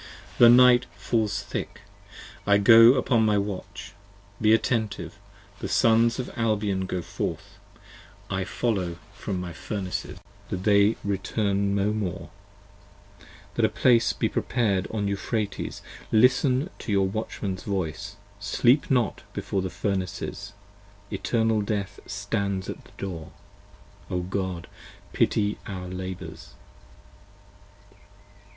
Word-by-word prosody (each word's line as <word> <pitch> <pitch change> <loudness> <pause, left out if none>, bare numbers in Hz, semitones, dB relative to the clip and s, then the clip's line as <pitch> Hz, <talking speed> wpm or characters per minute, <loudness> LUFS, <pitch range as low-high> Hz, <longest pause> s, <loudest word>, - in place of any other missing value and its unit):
The 120 - +9
night 125 0 +7
falls 105 -3 0
thick: - - -5 0.7
I 100 0 +6
go 115 +4 +8
upon 125 -3 +2
my 105 -1 +3
watch: 100 0 -5 0.5
be 110 0 +4
attentive: 110 -3 0 0.4
The - - -4
Sons 115 0 +4
of 130 - -4
Albion 105 -4 0
go 90 -2 -3
forth; 100 +6 -5 0.7
I 95 -1 -2
follow 95 -7 -2 0.2
from 100 -2 -4
my 90 -1 -5
Furnaces, 95 +2 -4 0.3
103 95 - -2
That 90 - -7
they 100 +1 +4
return 100 0 0
no 100 +1 +1
more: 100 -5 -4 1.2
that - - 0
a - - +5
place 120 -3 +3
be - - 0
prepared 105 -7 0
on 105 -2 -2
Euphrates. 100 +1 -3 0.3
Listen 130 - +3
to - - -5
your 100 -1 +3
Watchmans 100 -2 -4
voice: 100 +1 -3 0.2
sleep 125 - +2
not 125 -6 +1
before 95 - -2
the 95 - -3
Furnaces: 95 +1 -3 0.6
65 - - -5
Eternal 110 -2 +1
Death 100 -1 -3
stands 100 -1 -2
at - - -11
the - - -18
door. 85 -5 -6 0.8
O 90 - -1
God, 95 -1 -3 0.5
pity 105 -1 +1
our 95 -3 -5
labours. 90 0 -7
100 Hz, 120 wpm, -26 LUFS, 95-115 Hz, 1.2 s, The